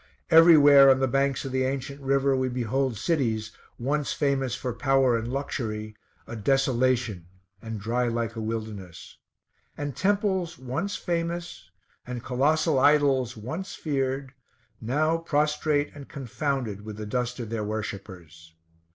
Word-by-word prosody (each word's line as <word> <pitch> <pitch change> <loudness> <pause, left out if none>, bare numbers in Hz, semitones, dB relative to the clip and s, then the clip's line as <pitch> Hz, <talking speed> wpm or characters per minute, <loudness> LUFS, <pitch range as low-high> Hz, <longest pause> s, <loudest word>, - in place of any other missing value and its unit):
Everywhere 145 -4 +8
on 130 0 +5
the 135 - +2
banks 135 +1 0
of 135 - -4
the 130 0 +1
ancient 140 +1 -3
river 135 0 +2
we 130 0 0
behold 125 0 -1
cities, 115 -7 -1 0.3
once 145 +4 -1
famous 135 -4 0
for 125 -1 -4
power 135 0 +2
and 115 +1 -3
luxury, 110 -6 -4 0.3
a 115 - -7
desolation, 120 -5 +1 0.3
and 110 -2 -6
dry 120 +4 0
like 115 -1 -2
a 115 - -4
wilderness; 110 -5 -6 0.6
and 145 -2 -4
temples 190 -4 0
once 160 +11 -3
famous, 170 - -4 0.4
and 125 -1 -5
colossal 150 +4 +2
idols 135 -4 +3
once 160 - -6
feared, 135 -2 -2 0.5
now 155 +8 +1
prostrate 150 -1 0
and 140 -2 -11
confounded 135 -6 -3
with 105 -1 -8
the 105 - -5
dust 125 +3 -2
of 115 -2 -6
their 115 -2 -2
worshippers. 95 -6 -7
130 Hz, 135 wpm, -26 LUFS, 115-145 Hz, 0.6 s, Everywhere